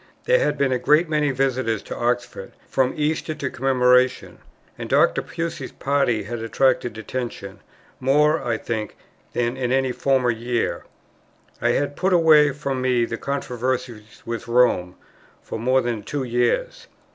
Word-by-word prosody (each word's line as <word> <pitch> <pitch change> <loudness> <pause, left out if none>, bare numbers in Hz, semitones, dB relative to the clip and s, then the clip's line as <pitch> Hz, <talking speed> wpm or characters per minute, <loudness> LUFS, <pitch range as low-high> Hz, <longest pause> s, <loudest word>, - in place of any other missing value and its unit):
There - - +3
had - - 0
been 140 -1 +1
a 125 - +1
great 155 +6 +3
many 150 -2 +1
visitors 130 -5 -1
to - - -7
Oxford 120 -4 -2
from 130 -1 +1
Easter 155 +1 -1
to 140 -3 -4
Commemoration; 125 -1 +2 0.4
and - - -7
Dr. - - +3
Pusey's 165 -5 -5
party 135 -5 0
had 120 +3 -5
attracted 120 0 0
attention, 110 -3 -6 0.4
more, 150 +4 +3
I 115 -2 -1
think, 110 -2 -4 0.4
than 120 0 -1
in 125 -2 -2
any 130 -1 +1
former 130 -1 +1
year. 120 +1 -2 0.8
I - - +2
had 145 0 -1
put 190 +4 +1
away 155 -4 +6
from 135 -2 -3
me 125 -2 +2
the 115 - -5
controversy 125 -4 -3 0.2
with 115 0 -5
Rome 120 -7 +2 0.5
for - - -6
more 130 +3 +2
than 120 -3 -3
two 140 +6 -4
years. 120 -1 -1
130 Hz, 150 wpm, -22 LUFS, 120-140 Hz, 0.8 s, away